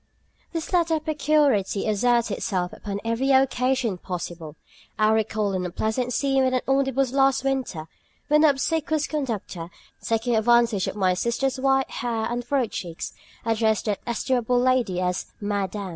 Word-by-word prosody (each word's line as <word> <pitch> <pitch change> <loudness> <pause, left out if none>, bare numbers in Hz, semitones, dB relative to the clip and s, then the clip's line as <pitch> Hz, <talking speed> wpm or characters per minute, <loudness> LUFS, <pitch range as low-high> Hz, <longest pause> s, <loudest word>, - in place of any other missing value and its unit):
This 330 +1 -5
latter 335 -2 +2
peculiarity 295 -10 +1
asserts 235 +2 +2
itself 180 -2 -2
upon 200 -1 -5
every 230 +4 0
occasion 260 -5 +2
possible. 170 -4 -6 0.4
I 215 0 +3
recall 215 -2 0
an 185 -1 -1
unpleasant 220 +7 -2
scene 270 +1 +2
in 260 0 +1
the 255 - 0
omnibus 270 -1 +1
last 270 -1 +3
winter, 260 -13 -2 0.4
when 300 0 +4
the 310 - +6
obsequious 310 +2 0
conductor, 225 - -4 0.3
taking 230 +1 0
advantage 230 -3 +3
of - - -4
my 190 -3 +2
sister's 255 +7 -1
white 270 0 +2
hair 230 -2 -2
and 240 0 -2
furrowed 245 -2 0
cheeks, 170 -2 -5 0.3
addressed 220 -1 +1
that 210 -3 -1
estimable 245 +1 +1
lady 245 -7 +2
as 180 0 -1
"Madam." 205 -1 -2
240 Hz, 145 wpm, -24 LUFS, 205-270 Hz, 0.4 s, the